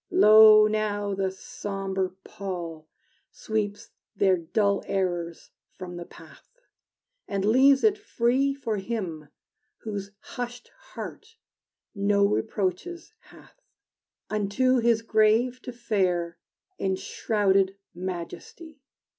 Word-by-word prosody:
Lo, 215 - +8
now, 210 -1 -1
the 195 0 -1
sombre 190 0 -4
pall 170 -5 -6 0.4
Sweeps 215 0 -4 0.2
their 190 -1 +3
dull 200 +4 0
errors 175 -3 -3 0.3
from 180 -2 -7
the 175 - -7
path, - - -16 0.8
And 195 -1 -2
leaves 265 +5 +5
it 425 -1 +3
free 270 - +1
For 225 -6 -3
him, 190 -8 -4 0.5
whose 205 -3 -5
hushed 245 +1 -7 0.3
heart 450 +1 -8 0.6
no 200 -1 +2
reproaches 210 - -2
hath, - - -19 0.7
Unto 215 +5 +1
his 230 -1 +2
grave 225 +3 +2
to 250 - -7
fare, 185 -8 -1 0.4
In 190 -1 0
shrouded 195 -2 0 0.2
majesty! 185 - -7
205 Hz, 100 wpm, -26 LUFS, 190-235 Hz, 0.8 s, Lo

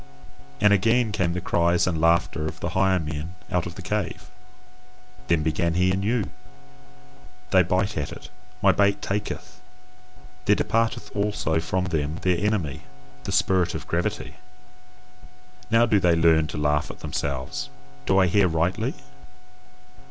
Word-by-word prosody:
And 105 -1 +5
again 115 +3 +2
came 95 -4 0
the 90 - -2
cries 85 -1 +2
and 85 -3 -1
laughter 85 -1 +2
of - - -7
the - - -3
higher 95 0 +2
men 80 +1 -5 0.2
out 90 -1 0
of 85 - -9
the 95 - -9
cave: 95 -2 -3 1.0
then 85 -3 +2
began 85 +2 0
he 90 +1 +3
anew: 100 +3 0 1.3
"They 95 - +6
bite 95 +4 0
at 75 - -3
it, - - -10 0.3
my 95 - +7
bait 100 +1 +2
taketh, 105 +1 -4 0.8
there 105 - +5
departeth 115 -2 -1
also 100 -6 0
from 90 +3 -1
them 80 -3 -2
their 90 -2 +2
enemy, 100 -8 -1 0.4
the - - -3
spirit 90 -2 +2
of - - -5
gravity. 85 +1 -3 1.3
Now 115 +1 +5
do 105 -3 +3
they 90 -2 +3
learn 80 -1 +4
to 80 - -6
laugh 75 +1 +1
at - - -10
themselves: 65 -1 -3 0.4
do 95 - +3
I 95 - +5
hear 95 +2 +3
rightly? 85 +2 -1
90 Hz, 145 wpm, -24 LUFS, 80-100 Hz, 1.3 s, my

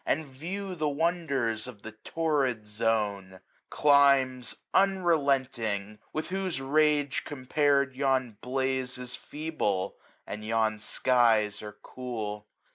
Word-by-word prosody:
And 155 +2 0
view 180 +9 -5
the 155 -4 -1
wonders 140 -8 0
of 105 -5 -11
the 110 - -7
Torrid 135 -2 -1
Zone: 105 -3 -1 0.3
Climes 140 -3 +4 0.2
unrelenting! 135 - +1
with 155 +2 -3
whose 185 -5 -2
rage 145 +1 +2
compar'd. 140 0 +1
Yon 130 -5 0
blaze 130 0 -1
is 125 -1 -5
feeble, 145 -12 -2 0.3
and 105 +1 -6
yon 110 -1 +1
skies 110 -3 +2
are 105 -1 -9
cool. 110 -5 -5
130 Hz, 110 wpm, -28 LUFS, 110-150 Hz, 0.3 s, Climes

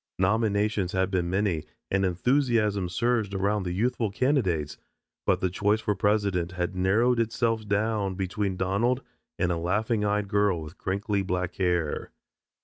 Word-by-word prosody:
Nominations 100 -1 +1
had 95 0 +1
been 90 -2 0
many 95 -4 0 0.3
and 95 0 +2
enthusiasm 105 -1 +1
surged 110 +1 0
around 100 +2 +1
the 90 -1 -3
youthful 110 +3 0
candidates, 95 - 0 0.5
but - - +2
the 95 - +1
choice 105 +3 +1
for 105 - 0
president 100 -3 0
had 90 0 -2
narrowed 110 +7 +2
itself 115 -1 0
down 100 -1 0
between 95 0 -2
Donald 105 +8 +1 0.3
and 90 -1 +1
a 85 - 0
laughing 105 +6 0
eyed 105 0 0
girl 100 -3 +2
with 80 +4 -11
crinkly 100 +2 -1
black 90 -1 -2
hair. 90 -4 0
100 Hz, 145 wpm, -27 LUFS, 90-110 Hz, 0.5 s, and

